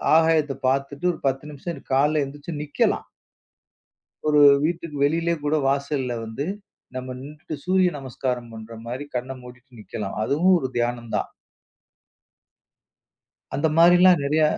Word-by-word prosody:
ஆகாயத்தை 160 -4 +3
பாத்துட்டு 140 +5 -1
ஒரு - - -10
10 135 +1 -1
நிமிஷம் 165 +4 -7
காலை 150 +3 +3
எந்திச்சு 145 +4 -8
நிக்கலாம். 150 - 0 1.2
ஒரு 150 -1 +4 0.3
வீட்டுக்கு 165 -3 -3
வெளியிலே 165 +3 +1
கூட 150 +1 +1
வாசல்ல 140 -3 -1
வந்து, 110 +6 -4 0.5
நம்ம 130 0 -5
நின்னுட்டு 150 +2 -8
சூரிய 185 0 +3
நமஸ்காரம் 125 -2 -4
பண்ற 110 +1 -9
மாரி 125 +5 -5
கண்ண 125 +2 -2
மூடிட்டு 125 -1 -14
நிக்கலாம். 105 -1 -6
அதுவும் 175 +9 +3
ஒரு 130 - -2
தியானம்தான். 120 -1 -1 2.3
அந்த 160 +3 +2
மாரிலாம் 175 +1 +7
நெறைய 155 +2 +2
140 Hz, 120 wpm, -24 LUFS, 125-160 Hz, 2.3 s, மாரிலாம்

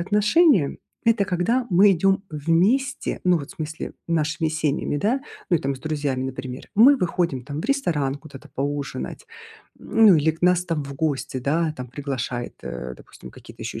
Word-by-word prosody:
отношения- 210 - +3 0.3
это 225 -3 +3
когда 210 +8 0
мы 195 +3 +6
идём 195 +2 +2
вместе, 180 - +1
ну, 180 -1 +4
вот, 145 0 -8
в - - -12
смысле 160 -2 -6
нашими 160 -1 0
семьями, 150 -1 -1
да, 235 - +1 0.3
ну 175 - +4
и - - -4
там 135 0 -1
с 130 - -12
друзьями, 145 -4 -2
например. 130 0 -6
Мы 255 +7 +7
выходим 170 - -1
там 145 +3 -5
в - - -9
ресторан 160 - 0
куда-то 140 -3 -13
поужинать, 140 +1 -4 0.6
м, 225 0 +2
ну 185 -5 +8
или 155 +1 +2
к 160 - -18
нас 180 0 +3
там 165 -3 -1
в 140 - -7
гости, 140 -3 -2
да, 155 +5 0
там 125 -2 -7
приглашает, 125 -2 -4
э, 60 0 -6
допустим, - - -14
какие-то - - -13
ещё - - -5
и - - -7
160 Hz, 185 wpm, -23 LUFS, 140-190 Hz, 0.6 s, ну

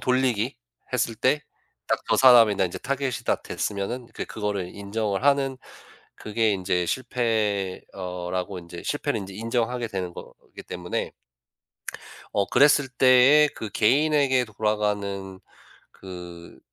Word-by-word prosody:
돌리기 125 -2 +1 0.4
했을 115 - 0
때 150 +6 +2 0.4
딱 - - 0
저 - - +3
'사람이다.' 115 -7 +6
이제 90 - -7
타겟이 135 0 -2
딱 - - 0
됐으면은 110 +5 -3 0.2
그거를 100 -4 -3
인정을 100 +1 -2
하는 135 -2 +2 0.6
그게 110 0 0
인제 90 -2 0
실패 110 -6 -1
어 90 -2 -5
라고 95 +1 -3
인제 85 0 -10
실패를 145 -5 -1
인제 95 0 -8
인정하게 115 +2 -1
되는 95 -4 -4
거기 - - -12
때문에 90 0 -4 1.2
어 100 - +2
그랬을 145 +2 +4
때에 130 +4 +6
그 110 - -6
개인에게 135 +1 +3
돌아가는 105 -3 -2 0.5
그 85 -5 -11
110 Hz, 260 characters per minute, -25 LUFS, 95-130 Hz, 1.2 s, 사람이다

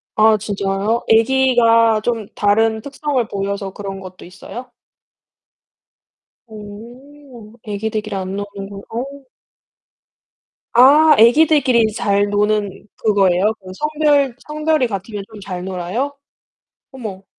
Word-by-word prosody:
아, 215 0 +5
진짜요? 200 +2 -2
애기가 230 -2 +4
좀 225 -3 -2
다른 220 +2 +1
특성을 280 -2 -2
보여서 200 -1 -4
그런 195 -1 -7
것도 185 -1 -11
있어요? 240 +7 -10 1.8
어. 235 +3 -13
애기들끼리 215 0 -4
안 190 0 -4
노는구나. 200 0 -7
어. 235 +3 -3 1.7
아, 295 +6 +6
애기들끼리 265 0 +4
이제 220 -1 0
잘 200 -2 +1
노는 205 -1 -1 0.2
그거예요? 200 -1 +2
그 185 -1 -11
성별 295 -2 +1
성별이 305 -2 0
같으면 200 -1 -6
좀 215 -2 -12
잘 180 -2 -6
놀아요? 190 +10 -3 0.8
어머. 210 -7 -8
220 Hz, 230 characters per minute, -18 LUFS, 200-250 Hz, 1.8 s, 아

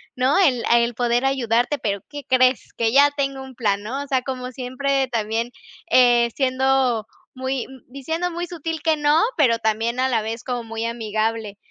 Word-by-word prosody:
¿no?, 260 +7 +2
el 260 -11 +3
el 235 0 +2
poder 240 +1 +1
ayudarte. 255 0 +1
Pero, 200 -6 -2
¿qué 290 -1 -7
crees, 255 -1 +2
que 225 -1 0
ya 285 +3 +6
tengo 275 -1 -2
un 265 0 -11
plan?", 205 -5 -1
¿no? 255 +6 -4
O - - -11
sea, 260 -2 0
como 255 -1 -5
siempre, 265 +2 -1
también, 230 0 -2 0.4
eh, 240 -2 +5
siendo 260 -3 +1 0.3
muy, 260 0 -2
m 265 -1 -14
diciendo 320 +7 -3
muy 345 +1 -4
sutil 325 -2 -5
que 320 -1 +2
no, 295 +2 +3 0.2
pero 240 -7 +3
también 225 +2 -1
a 260 +1 +2
la 230 -3 +1
vez 225 +2 -5
como 245 -2 -3
muy 225 0 -5
amigable. 220 -2 -2
255 Hz, 185 wpm, -22 LUFS, 230-275 Hz, 0.4 s, ya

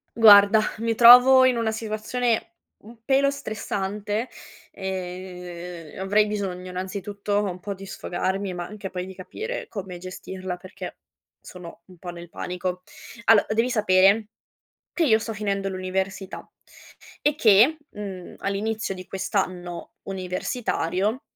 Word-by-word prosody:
Guarda, 210 -1 +8 0.2
mi 230 +1 0
trovo 250 +3 +9
in 255 -2 +4
una 225 -1 0
situazione 225 +5 -2 0.3
un 225 +1 -15
pelo 275 +3 +3
stressante, 210 -3 -3 0.4
ehm, 180 -3 -7
avrei 205 +2 +3
bisogno, 190 -3 -4
innanzitutto, 200 +2 -3
un 185 -3 -3
po' 200 +2 -5
di 195 0 -10
sfogarmi, 190 +1 -3
ma 175 - -4
anche 200 -1 -8
poi 180 0 -4
di 190 - -10
capire 450 - -6
come 190 -4 -6
gestirla 185 0 -6
perché 185 +1 -9 0.4
sono 175 -2 -11
un 185 -2 -17
po' 175 +1 -8
nel 170 0 -10
panico. 180 +1 -4 0.4
Allo 225 -2 +6
devi 230 +3 +1
sapere 205 0 +4 0.6
che 345 - 0
io 220 -5 +4
sto 225 +1 -5
finendo 200 -1 -2
l'università 190 +1 -4 0.7
e 295 - +3
che, 235 +4 +5
mhmm, 195 -3 -8
all'inizio 205 +1 -2
di 185 -1 -9
quest'anno 180 -2 -3
universitario, 190 - -2
195 Hz, 125 wpm, -24 LUFS, 185-220 Hz, 0.7 s, trovo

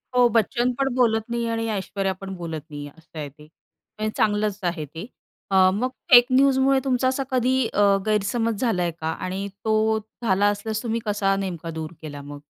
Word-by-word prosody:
हो, 245 -1 +6
बच्चन 235 +2 +1
पण 270 -2 +1
बोलत 225 -3 +3
नाही 235 0 -1
आणि 225 0 -1
ऐश्वर्या 195 -1 -2
पण 195 0 -6
बोलत 165 -3 -5
नाही 145 -1 -7
आहे, 145 - -16
असं 165 0 -16
आहे 145 -1 -4
ते. 150 +2 -18
म्हणजे 215 +7 -8
चांगलंच 210 -1 +1
आहे 170 -3 -2
ते. 165 +7 -8 0.5
अ, - - +2 0.2
मग 250 +5 0 0.2
फेक 245 -1 +10
न्यूजमुळे 270 0 +4
तुमचा 255 0 +1
असा 265 +1 0
कधी 255 0 +2 0.2
अ, 205 - +2 0.2
गैरसमज 215 +1 0
झालाय 180 -8 +1
का? 160 +1 -1
आणि 190 +3 -4 0.2
तो 220 0 +2 0.2
झाला 200 -1 +2
असल्यास 215 +2 -2
तुम्ही 230 0 -1
कसा 200 -2 +1
नेमका 180 -4 -4
दूर 155 0 -5
केला 145 -2 -7
मग? 145 0 -9
210 Hz, 185 wpm, -24 LUFS, 175-235 Hz, 0.5 s, फेक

